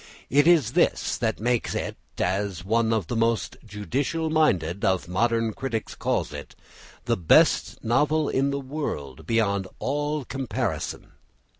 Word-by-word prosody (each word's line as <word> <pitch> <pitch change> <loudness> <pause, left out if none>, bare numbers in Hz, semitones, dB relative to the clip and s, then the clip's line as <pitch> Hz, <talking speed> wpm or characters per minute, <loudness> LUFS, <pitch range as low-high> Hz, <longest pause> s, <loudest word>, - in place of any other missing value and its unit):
It 145 +4 +5
is 155 -10 +5
this - - +2
that 110 -2 -1
makes 120 +1 0
it, - - -3 0.2
as 95 -1 -1
one 115 +2 +2
of 110 -5 +1
the 120 - -4
most 115 0 0
judicial 130 - -2
minded 95 - +1
of 95 -2 +1
modern 115 +4 +1
critics 115 -3 -4
calls - - -1
it, - - -9 0.5
"the - - +2
best 85 - +3
novel 150 +6 +2
in 135 +1 +1
the 140 0 -1
world 130 - -5
beyond 100 -4 +1
all 145 +1 -2
comparison." 135 -1 -3
115 Hz, 140 wpm, -25 LUFS, 100-140 Hz, 0.5 s, It